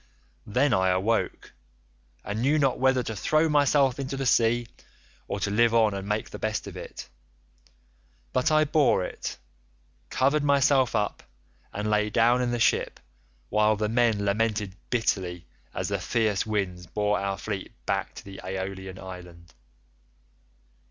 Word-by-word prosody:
Then 130 +5 +2
I 95 0 +3
awoke, 95 +5 -1 0.7
and 105 +2 -3
knew 145 +5 +3
not 135 -4 +1
whether 130 -1 +3
to 110 - -5
throw 155 +10 +2
myself 145 -3 +3
into 135 0 -4
the 135 - -2
sea 120 -1 +3 0.6
or - - -3
to 100 - -1
live 115 +2 +3
on 110 -3 +4
and 100 0 -5
make 105 +1 -2
the - - -7
best 110 0 -2
of - - -9
it; - - -8 1.3
but 130 +4 +2
I 155 0 +5
bore 150 -9 +3
it, - - -6 0.7
covered 140 +3 +2
myself 140 -3 +3
up, 105 -2 -1 0.5
and 105 +1 -3
lay 105 0 +2
down 120 +3 +3
in 125 - 0
the 120 0 -1
ship, 115 - +1 0.5
while 105 0 +3
the 105 0 -1
men 115 -3 +2
lamented 105 -1 0
bitterly 95 -7 -1 0.3
as - - -3
the - - -1
fierce 110 -3 0
winds 95 -5 -2
bore 105 +3 0
our 100 0 -2
fleet 100 -3 -5
back - - -2
to - - -10
the 95 -1 -9
Aeolian 95 0 -5
island. 90 -3 -11
110 Hz, 150 wpm, -26 LUFS, 100-125 Hz, 1.3 s, I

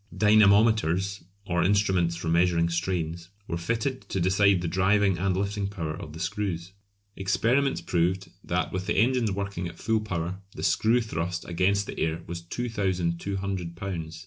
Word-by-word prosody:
Dynamometers, 105 -3 +4 0.2
or 85 -2 0
instruments 95 -3 +2
for 85 -1 -5
measuring 85 0 +3
strains, 85 0 -2 0.2
were 85 - -2
fitted 115 +9 -2
to 95 - -1
decide 95 +1 +3
the - - -1
driving 95 +1 +2
and 95 0 +1
lifting 100 0 -1
power 85 -6 -4
of 75 -1 -8
the 80 - -9
screws. 90 -1 -3 0.4
Experiments 115 +9 +1
proved 90 +2 0
that - - -1
with 95 +1 -3
the 105 - 0
engines 120 0 +3
working 100 -2 -3
at 85 - -10
full 110 -1 0
power 95 -2 -3 0.2
the - - -6
screw 115 +3 +3
thrust 85 -5 -3
against 95 +4 +1
the - - -7
air 80 +1 -1
was 85 0 -6
2200 95 -3 -2
lbs. 85 -4 -5
95 Hz, 155 wpm, -27 LUFS, 85-100 Hz, 0.4 s, Dynamometers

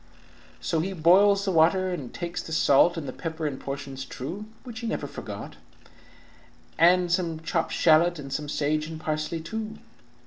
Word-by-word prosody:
"So 165 - -1
he 190 +4 -2
boils 195 +4 +5
the 195 - +1
water, 185 +3 +3
and 145 -9 -5
takes 175 0 -4
the - - -10
salt 160 +2 +4
And 150 -4 -4
the 130 - -5
pepper 160 -2 -5
in 140 -3 -3
portions 135 -1 -6
true 165 +10 -6 0.2
(Which 240 -4 -8
he 235 - -4
never - - -2
forgot) - - -8 1.2
and 175 +1 +5
some 170 -3 0
chopped 165 0 -1
shalot, 170 +2 +4
And 135 -2 -7
some 150 0 -3
sage 155 +1 0
and 160 -1 -7
parsley 155 +1 -2
too. 220 +5 -5
165 Hz, 170 wpm, -26 LUFS, 155-185 Hz, 1.2 s, boils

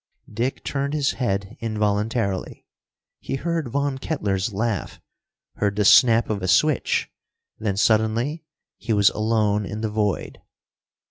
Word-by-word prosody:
Dick 120 +5 -2
turned 140 +1 -2
his 145 -3 +1
head 100 -5 -3
involuntarily. 105 -2 -2 0.5
He - - -4
heard 165 +1 -2
Von 140 +1 -1
Kettler's 105 -9 -2
laugh, 110 0 -3 0.6
heard 100 -1 0
the 105 -1 +1
snap 115 +1 +6
of 105 -3 -2
a 95 - -2
switch 145 +10 +2 0.5
then 105 -3 -2
suddenly 110 +9 +1 0.4
he 115 - -2
was 100 -1 +4
alone 105 -1 +1
in 105 +2 -5
the 110 -1 -2
void. 105 -2 -2
110 Hz, 130 wpm, -23 LUFS, 100-130 Hz, 0.6 s, snap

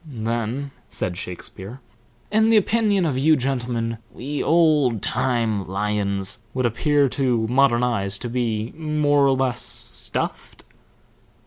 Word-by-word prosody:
"Then," 120 0 -3 0.2
said 90 - -3
Shakespeare, 95 +6 -7 0.5
"in 220 +1 +4
the 225 - +6
opinion 210 -2 +2
of 135 -5 0
you 155 +3 +5
gentlemen, 120 -4 -2
we 145 +4 -4
old 150 - +3
time 115 -5 0
lions 100 0 -1 0.2
would 130 -1 0
appear 145 +5 +2
to 125 -4 +1
modern 125 0 +3
eyes 100 -5 0
to 120 - -5
be 115 -2 -2
more 150 -2 +2
or 135 - +3
less 130 -2 0
stuffed?" - - -4
125 Hz, 125 wpm, -22 LUFS, 110-145 Hz, 0.5 s, the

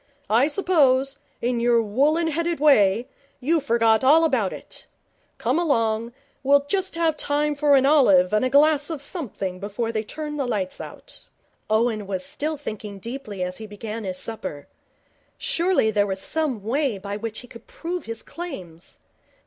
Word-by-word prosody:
I 240 +6 +5
suppose, 280 -6 +2 0.3
in 240 0 0
your 235 0 +3
woollen 285 +10 +2
headed 335 +1 -1
way, 230 -7 +4 0.3
you 315 +6 +2
forgot 230 -5 +2
all 305 +5 +6
about 255 - +1
it. - - -8 0.5
Come 255 +8 0
along. 230 -8 0 0.3
We'll 280 +1 +4
just 380 +1 0
have 330 -2 +1
time 295 0 0
for 290 0 +3
an 270 0 +4
olive 210 -11 +5
and 215 - +3
a 255 - +1
glass 290 +2 +4
of 320 -3 -4
something 230 - -4
before 210 +4 -3
they 220 -1 -1
turn 300 +6 -6
the 275 -3 -1
lights 200 -6 -2
out.' - - -11 0.4
Owen 215 -2 +1
was 190 -2 -3
still 305 +1 -3
thinking 215 -7 -7
deeply 215 -3 -5
as 180 0 -4
he 220 - -8
began 215 +2 -6
his 185 -2 -3
supper. 185 -10 -5 0.7
Surely 340 -10 +1
there 205 -1 +2
was 190 -1 -3
some 275 -3 -1
way 255 0 0
by 200 +1 -5
which 220 +1 -5
he 245 - -13
could 230 -1 -14
prove 350 +2 -5
his 230 0 -5
claims. 185 - -8
245 Hz, 165 wpm, -23 LUFS, 215-295 Hz, 0.7 s, all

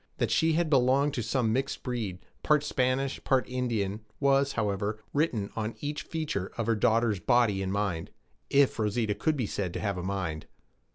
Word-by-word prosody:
That - - 0
she 160 0 +3
had 170 +1 +2
belonged 135 0 +3
to 125 - -1
some 115 0 0
mixed 135 +2 -2
breed, 115 -8 -3 0.2
part 150 -1 +3
Spanish, 130 -1 0
part 130 -2 +2
Indian, 115 -6 -1 0.2
was, 140 0 +3
however, 105 -1 -1 0.2
written 125 -10 0
on 110 0 -3
each 150 +1 -3
feature 150 - -3
of 115 - -1
her 115 0 +2
daughter's 110 -1 +2
body 115 -4 +3
and 95 -1 -2
mind 100 -5 -1 0.4
if 140 -3 +3
Rosita 110 0 +1
could 145 +9 0
be 125 - 0
said 95 -3 -3
to - - -3
have 100 -4 -2
a - - -5
mind. 95 -5 -3
115 Hz, 180 wpm, -29 LUFS, 100-135 Hz, 0.4 s, she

